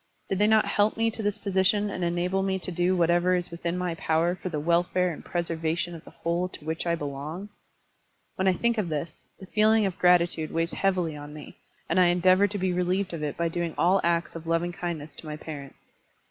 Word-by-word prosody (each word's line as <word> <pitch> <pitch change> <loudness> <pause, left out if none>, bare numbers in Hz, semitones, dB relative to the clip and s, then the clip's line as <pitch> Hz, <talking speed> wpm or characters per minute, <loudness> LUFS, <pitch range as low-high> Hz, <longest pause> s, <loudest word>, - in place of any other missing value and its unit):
Did 195 - -1
they 210 - +4
not 220 0 +4
help 210 +1 +1
me 225 0 +2
to 225 - -4
this 205 0 -1
position 200 +1 +1
and 185 - -3
enable 175 +2 0
me 190 0 0
to 185 - -4
do 175 +2 +1
whatever 175 +1 +3
is 175 -1 -2
within 170 +1 -3
my 180 -1 -1
power 165 +1 +1
for 185 0 -5
the 155 -3 -2
wel 170 +3 +3
fare 180 0 0
and - - -10
preservation 170 0 -2
of 165 - -9
the - - -13
whole 170 +2 -2
to 155 - -12
which 160 +2 -3
I 170 - +2
belong? 150 +6 -6 0.8
When 190 - -1
I 190 - +5
think 235 +4 0
of 185 -5 -1
this, 155 +1 -5
the 190 - -9
feeling 215 +2 +3
of 190 -3 -3
gratitude 175 -3 +3
weighs 165 +1 0
heavily 180 -5 0
on 145 0 -9
me, 150 - -11 0.3
and 170 +3 +2
I 180 - +6
endeavor 185 +3 +4
to 205 +1 -4
be 185 -1 0
relieved 180 +1 0
of 165 - -4
it 150 -1 -3
by 170 - +1
doing 170 -1 -3
all 185 +3 +3
acts 170 0 0
of 165 0 -8
loving 165 +1 +1
kindness 160 -4 -5
to 160 - -10
my 150 0 -5
parents. 145 -3 -10
175 Hz, 230 wpm, -27 LUFS, 165-190 Hz, 0.8 s, I